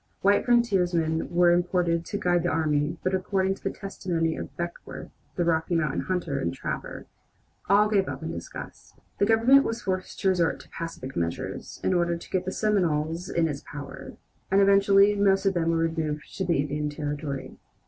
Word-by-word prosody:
White 200 +1 +3
frontiersmen 180 -9 +2
were 175 0 +4
imported 175 -1 +1
to 205 - -3
guide 175 -4 +2
the 175 - 0
army, 155 0 0
but 185 - 0
according 190 0 +1
to - - -14
the - - 0
testimony 170 -4 -2
of - - -8
Beckworth, 170 0 -6 0.2
the 175 - 0
Rocky 165 +1 +1
Mountain 155 -4 0
hunter 175 -6 -2
and 85 - -1
trapper, - - -5 0.6
all 205 +1 +5
gave 200 -3 +1
up - - -6
in - - -3
disgust. - - -9 0.2
The 200 - +3
Government 235 +5 +6
was 230 +1 -3
forced 185 -1 -3
to 195 - +3
resort 175 -3 +1
to - - -18
pacific 165 -6 -7
measures 85 0 -4
in - - +2
order 170 -1 +1
to - - -12
get 185 -1 0
the 185 - -2
Seminoles 170 -5 0
in 165 -1 +1
its 145 -2 -4
power, 145 -1 -9 0.4
and 195 - +4
eventually 200 0 +5
most 200 -1 +2
of 195 - +3
them 165 -2 0
were 165 - +2
removed 160 -2 -2
to 190 - -1
the 170 -2 +2
Indian 150 +1 -1
Territory. 145 -2 -5
175 Hz, 185 wpm, -26 LUFS, 160-195 Hz, 0.6 s, Government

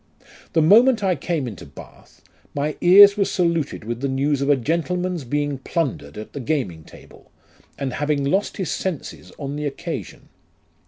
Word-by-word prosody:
11 - - -23 0.2
The 160 - +3
moment 230 +6 +5
I 185 -2 +2
came 150 -2 -2
into 105 -7 -8
Bath, 70 - -15 0.3
my 145 +1 -1
ears 200 +3 +8
were 200 - +3
saluted 170 - -1
with 120 +2 -5
the 140 - 0
news 140 +1 0
of 140 - 0
a 145 - +6
gentleman's 170 +5 -2
being 145 +1 -2
plundered 140 -5 -3
at 105 - -9
the 140 - -5
gaming 120 - -2
table, - - -17 0.5
and 135 -2 -3
having 145 -1 -1
lost 190 +9 0
his 190 -5 -3
senses 185 -6 -5
on 140 -1 -5
the 150 0 -2
occasion. 140 - -7
150 Hz, 170 wpm, -22 LUFS, 135-180 Hz, 0.5 s, ears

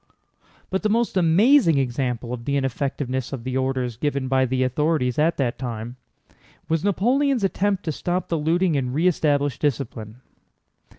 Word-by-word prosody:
But 190 - 0
the 215 - 0
most 230 +1 +1
amazing 185 - +4
example 125 -2 -2
of 115 -1 -6
the 140 0 0
ineffectiveness 135 -1 -2
of 125 -4 -5
the 130 0 -4
orders 130 -3 -1
given 140 -1 -1
by 130 0 +2
the 130 +1 0
authorities 130 0 0
at 165 +3 +2
that 125 -4 -1
time 120 -1 -5 0.7
was 165 0 0
Napoleon's 245 +6 +1
attempt 195 0 0
to 160 - -2
stop 175 +4 -2
the 165 - -1
looting 165 +2 +1
and 130 -2 -1
re 160 +4 +1
establish 145 -5 +1
discipline. 120 -5 -3
140 Hz, 160 wpm, -23 LUFS, 130-175 Hz, 0.7 s, amazing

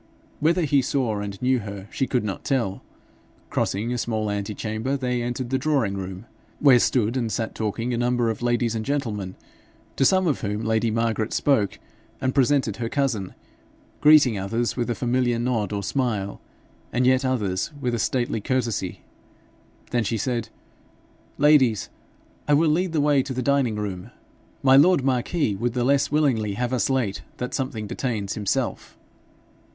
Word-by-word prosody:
Whether 165 +3 +2
he 145 -2 +3
saw 125 -5 -1
and 100 -1 -5
knew 130 0 +3
her 100 -2 -7
she 135 - -1
could 125 -3 0
not 100 -4 -4
tell. 115 -8 -1 0.7
Crossing 110 +5 -1
a 125 - -2
small 110 -3 -1
antechamber 110 +5 -2
they 125 -2 -1
entered 120 +1 -3
the 130 - +1
drawing 135 -8 +1
room, 95 +1 -6 0.3
where 135 -4 +6
stood 115 -1 +1
and 115 -4 -1
sat 115 0 -2
talking 115 +3 -2
a - - -1
number 120 -1 +1
of 110 - -7
ladies 120 -1 +1
and 110 -1 -2
gentlemen, 110 -9 -3 0.6
to - - +3
some 185 +7 +4
of 150 -6 0
whom 105 -1 -2
lady 110 +1 +1
Margaret 115 0 -1
spoke 110 -9 +1 0.4
and 130 -1 -1
presented 135 -5 +2
her 115 -1 -3
cousin, 120 -10 -1 0.6
greeting 145 -8 +6
others 115 +5 -1
with 120 -1 -2
a 120 - 0
familiar 120 -1 +1
nod 115 -4 -1
or 100 -1 -2
smile, 105 -5 -2 0.5
and 125 +2 +1
yet 130 +1 +4
others 105 -8 -1
with 125 -3 -1
a 120 - -1
stately 120 -1 0
courtesy. 115 -7 -2 0.9
Then 120 -1 +1
she 115 +2 -1
said, 120 -1 -2 0.9
'Ladies, 140 -7 +4 0.6
I 145 - +5
will 155 +1 +3
lead 175 +2 0
the 155 - +2
way 145 -2 +4
to 130 0 -5
the 130 - -2
dining 135 -4 +2
room. 100 -4 -5 0.5
My 135 0 +6
lord 160 0 +5
marquis 130 - 0
would 115 +4 -2
the 125 -1 0
less 140 +2 +2
willingly 125 -9 +1
have 125 +3 -2
us 130 - +1
late 125 -7 0 0.2
that 125 - -4
something 130 -6 -3
detains 105 -3 -3
himself.' 105 -2 -2
120 Hz, 165 wpm, -24 LUFS, 110-135 Hz, 0.9 s, where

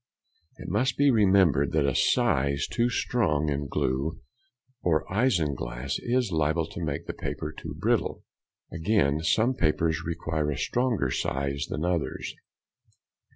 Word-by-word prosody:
It - - -9
must 115 +6 0
be 145 -1 +5
remembered 95 - +4
that 75 -3 +2
a 70 - +1
size 70 +2 +2
too 120 +1 0
strong 80 -13 0
in 70 0 -2
glue 70 +5 -1 0.6
or 80 -3 +1
isinglass 70 - 0
is 120 -3 0
liable 80 +1 +1
to 100 -5 -6
make 75 +1 -3
the - - -5
paper 75 - -4
too - - -8
brittle; - - 0 0.5
again, 80 -4 +1
some 110 +10 +2
papers 80 -3 +1
require 80 -2 -2
a 75 - -2
stronger 120 - 0
size 70 +2 -2
than 75 +3 -2
others. 90 -3 -2
80 Hz, 135 wpm, -27 LUFS, 70-100 Hz, 0.6 s, be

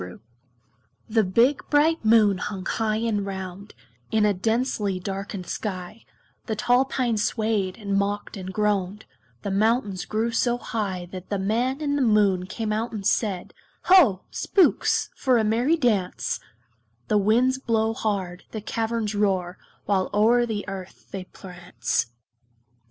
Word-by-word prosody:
The 90 - -5
GOBLINS' 90 - -12
CHRISTMAS 120 - -21
The 220 - +5
big 235 +9 +2
bright 305 +1 +3
Moon 215 -3 +5
hung 190 -1 -5
high 215 0 0
and 220 -2 0
round, 190 0 -7 0.3
In 220 -1 +2
a 205 - +3
densely 210 -1 -1
darkened 195 0 -5
sky; 190 +2 -5 0.4
The 220 - -1
tall 245 +4 +3
pines 240 -5 0
swayed, 215 -4 -1
and 200 -3 -2
mocked, 200 +1 -1
and 190 -1 -6
groaned; 205 -1 -1 0.4
The 200 - -2
mountains 210 -1 +1
grew 225 +2 -1
so 240 +1 +1
high 195 -7 -3
That 185 -1 -8
the 205 - -1
Man 235 +8 0
in 285 -1 0
the - - 0
Moon 205 -6 +3
came 215 +2 -3
out 225 +3 -2
and 205 -3 -6
said, 200 -2 0 0.3
"Ho! 285 - +6
Spooks, 380 -4 +2
for 255 -2 +2
a 225 - +2
merry 240 +9 +2
dance." 215 - 0 0.7
The 210 - +3
winds 245 +6 +3
blow 225 -3 +1
hard, 195 -5 -3
the 220 - -6
caverns 225 0 -2
roar, 190 -3 0 0.3
While 190 -2 +1
o'er 240 +3 +4
the 210 -3 -4
earth 190 -2 -8
they 190 -2 -5
prance. 175 - -3
210 Hz, 150 wpm, -24 LUFS, 190-230 Hz, 0.7 s, Ho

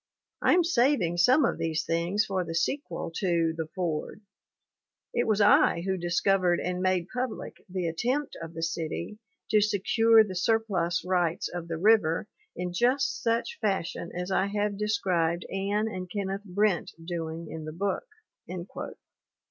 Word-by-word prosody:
I - - +5
am 355 - +4
saving 245 - +2
some 255 - +5
of - - -1
these 160 -1 -1
things 170 +5 +1
for 190 -2 -1
the 165 -1 -5
sequel 270 - -2
to 170 -4 +1
The 160 -1 -3
Fordl 170 +2 -2 0.9
It 240 - +1
was 215 -2 +2
I 205 -4 +5
who 190 +2 -1
discovered 175 +1 +2
and 180 0 -2
made 185 -2 +1
public 250 -1 -4
the 185 -1 -2
attempt 250 - -1
of 165 0 -8
the 165 - -4
city 165 +5 -3 0.3
to 215 - +5
secure 220 +2 +4
the 200 -3 -6
surplus 185 -3 0
rights 175 -2 0
of 175 -1 -6
the 165 -1 -3
river 195 -2 +3 0.3
in 180 0 -4
just 255 +7 +1
such 230 0 -1
fashion 190 -5 -1
as 180 +2 -3
I 190 +1 +2
have 205 0 -1
described 185 -5 0
Anne 200 +3 0
and 185 -4 -5
Kenneth 200 +1 -3
Brent 200 -1 0
doing 165 -1 -4
in 160 -1 -6
the 155 - -5
book." 200 - -2
185 Hz, 155 wpm, -28 LUFS, 170-210 Hz, 0.9 s, I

